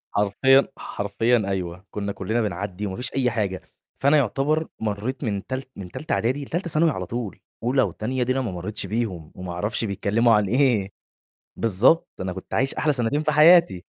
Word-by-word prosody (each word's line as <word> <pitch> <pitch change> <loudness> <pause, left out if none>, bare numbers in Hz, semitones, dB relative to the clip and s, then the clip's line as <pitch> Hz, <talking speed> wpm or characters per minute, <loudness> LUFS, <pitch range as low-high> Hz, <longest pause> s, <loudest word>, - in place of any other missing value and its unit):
حرفيًا 120 +7 +4
حرفيًا 115 +4 0
أيوه، 90 -1 -4
كنّا 100 -1 -3
كلّنا 110 +4 -1
بنعدّي 100 -1 -3
وما 95 - -5
فيش 125 +3 -4
أي 130 -2 +2
حاجة، 100 -5 -2 0.4
فأنا 140 +2 +5
يعتبر 145 +5 +1
مرّيت 110 +5 -3
من 100 -3 -2
تال 130 +1 -3
من 90 -3 -8
تالتة 155 - -4
إعدادي 130 +5 0
لتالتة 170 +5 -3
ثانوي 160 +2 +3
على 95 -9 -4
طول، 115 -2 -5 0.2
أولى 130 +3 +2
وتانية 125 +4 -1
دي 125 - -1
أنا 135 +1 +1
ما 115 -6 -3
مرّيتش 95 +4 -5
بيهم 95 -7 -3
وما 90 -1 -6
أعرفش 105 +6 -2
بيتكلّموا 110 +4 +2
عن 105 -2 +3
إيه، 115 -4 +2 0.6
بالضبط، 115 - +3
أنا 95 -1 -3
كنت 95 - -9
عايش 135 0 +1
أحلى 150 -1 +1
سنتين 135 +4 0
في 155 - +1
حياتي. 155 - +6
115 Hz, 180 wpm, -24 LUFS, 100-135 Hz, 0.6 s, حياتي